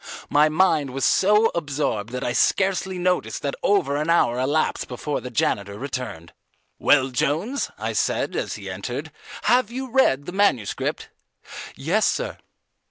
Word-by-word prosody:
My 150 Hz, +1 st, +5 dB
mind 155 Hz, -3 st, +2 dB
was 135 Hz, -, 0 dB
so 210 Hz, +3 st, +4 dB
absorbed 145 Hz, -9 st, -2 dB
that 125 Hz, 0 st, -4 dB
I 120 Hz, -, -1 dB
scarcely 190 Hz, +2 st, +1 dB
noticed 180 Hz, 0 st, -1 dB
that 140 Hz, -, -1 dB
over 165 Hz, -9 st, +2 dB
an 155 Hz, +2 st, -2 dB
hour 125 Hz, -8 st, +3 dB
elapsed 145 Hz, +5 st, 0 dB
before 135 Hz, +3 st, -4 dB
the 125 Hz, -, -6 dB
janitor 100 Hz, -3 st, -1 dB
returned. 125 Hz, -11 st, -6 dB, 0.5 s
"Well, 135 Hz, -2 st, +4 dB
Jones," 160 Hz, -, -1 dB
I -, -, -3 dB
said -, -, 0 dB
as -, -, -2 dB
he -, -, -9 dB
entered, -, -, -5 dB, 0.3 s
"have 245 Hz, -3 st, +3 dB
you 260 Hz, +1 st, -6 dB
read 145 Hz, -, +3 dB
that 180 Hz, -, -6 dB
manuscript?" 190 Hz, -, 0 dB, 0.7 s
"Yes, 175 Hz, +10 st, +1 dB
sir." -, -, -2 dB
150 Hz, 150 wpm, -23 LUFS, 130-190 Hz, 0.7 s, My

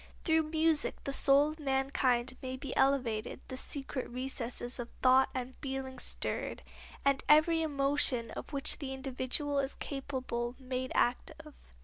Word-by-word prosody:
Through 320 Hz, -2 st, +2 dB
music 320 Hz, -1 st, +2 dB
the 275 Hz, -, -3 dB
soul 280 Hz, +2 st, +5 dB
of 310 Hz, -, -11 dB
mankind 265 Hz, -3 st, +1 dB
may 260 Hz, 0 st, -4 dB
be 275 Hz, 0 st, -6 dB
elevated, 255 Hz, -5 st, +1 dB
the 260 Hz, -, -5 dB
secret 270 Hz, 0 st, -4 dB
recesses 250 Hz, -1 st, -4 dB
of 240 Hz, -1 st, -5 dB
thought 260 Hz, +1 st, +6 dB
and 255 Hz, 0 st, -4 dB
feeling 265 Hz, -1 st, -5 dB
stirred, -, -, -1 dB, 0.4 s
and 275 Hz, -1 st, +2 dB
every 315 Hz, +2 st, +5 dB
emotion 275 Hz, -5 st, +2 dB
of -, -, -7 dB
which 280 Hz, -2 st, +2 dB
the 265 Hz, -3 st, -4 dB
individual 270 Hz, +2 st, -1 dB
is 275 Hz, 0 st, -2 dB
capable 260 Hz, -3 st, -4 dB
made 255 Hz, -1 st, -4 dB
active. 300 Hz, +5 st, -1 dB
270 Hz, 140 wpm, -32 LUFS, 255-285 Hz, 0.4 s, thought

